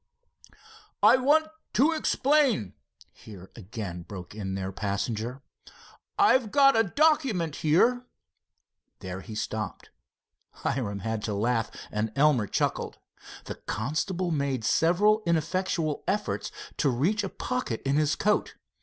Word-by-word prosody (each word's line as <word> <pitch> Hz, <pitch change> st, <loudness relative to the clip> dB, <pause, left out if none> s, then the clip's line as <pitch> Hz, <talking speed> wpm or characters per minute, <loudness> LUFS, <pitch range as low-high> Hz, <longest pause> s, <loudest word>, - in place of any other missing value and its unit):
"I -, -, +8 dB
want 295 Hz, +5 st, +4 dB, 0.3 s
to 280 Hz, +8 st, +4 dB
explain," 280 Hz, -, +2 dB, 0.4 s
here 95 Hz, -4 st, -13 dB
again 100 Hz, -4 st, -6 dB
broke 90 Hz, +1 st, -9 dB
in 95 Hz, -3 st, -4 dB
their 95 Hz, 0 st, -3 dB
passenger. 110 Hz, +6 st, -3 dB, 0.7 s
"I've 265 Hz, -, +4 dB
got 275 Hz, +2 st, +5 dB
a 225 Hz, -, +5 dB
document 230 Hz, -, +1 dB
here——" 240 Hz, +11 st, +2 dB, 0.9 s
There 95 Hz, +1 st, -6 dB
he 110 Hz, 0 st, -9 dB
stopped. 110 Hz, -1 st, -4 dB, 0.6 s
Hiram 100 Hz, -6 st, -3 dB
had 110 Hz, +1 st, -2 dB
to 105 Hz, -, -2 dB
laugh 115 Hz, +2 st, 0 dB, 0.2 s
and 105 Hz, +1 st, -1 dB
Elmer 140 Hz, -7 st, +3 dB
chuckled. -, -, -1 dB, 0.5 s
The -, -, -8 dB
constable 170 Hz, -, -2 dB
made 140 Hz, -6 st, -1 dB
several 205 Hz, -, +3 dB
ineffectual 165 Hz, -1 st, 0 dB
efforts 210 Hz, +1 st, -1 dB, 0.3 s
to 145 Hz, -, +2 dB
reach 165 Hz, -, +1 dB
a 195 Hz, -, -3 dB
pocket 250 Hz, -, -3 dB
in 140 Hz, +1 st, +2 dB
his 150 Hz, -1 st, +2 dB
coat. 210 Hz, +1 st, 0 dB
150 Hz, 120 wpm, -27 LUFS, -, 0.9 s, I